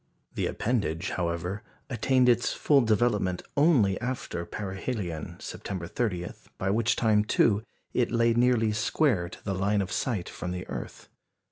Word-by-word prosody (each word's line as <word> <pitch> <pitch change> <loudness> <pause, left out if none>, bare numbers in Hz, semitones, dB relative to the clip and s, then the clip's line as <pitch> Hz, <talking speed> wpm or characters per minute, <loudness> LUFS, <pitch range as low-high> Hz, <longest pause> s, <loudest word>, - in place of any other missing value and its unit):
The - - -1
appendage, 100 -7 -1
however, 90 +3 -2 0.3
attained 130 +1 +2
its 120 -1 +3
full 145 -2 +4
development 105 -5 +1
only 140 - +4
after 120 -9 -4
perihelion, 95 - -4
September 95 -4 -5
30, 90 -2 -2 0.3
by 95 +1 0
which 115 +2 +2
time, 110 -2 +3
too, 105 -1 +3 0.3
it 125 - +2
lay 115 0 +3
nearly 120 -2 +3
square 105 - +1
to - - -12
the 100 - -1
line 100 +2 +1
of 95 -2 -2
sight 105 -6 -1
from 90 - -6
the 90 0 -6
earth. - - -7
105 Hz, 145 wpm, -28 LUFS, 90-120 Hz, 0.3 s, full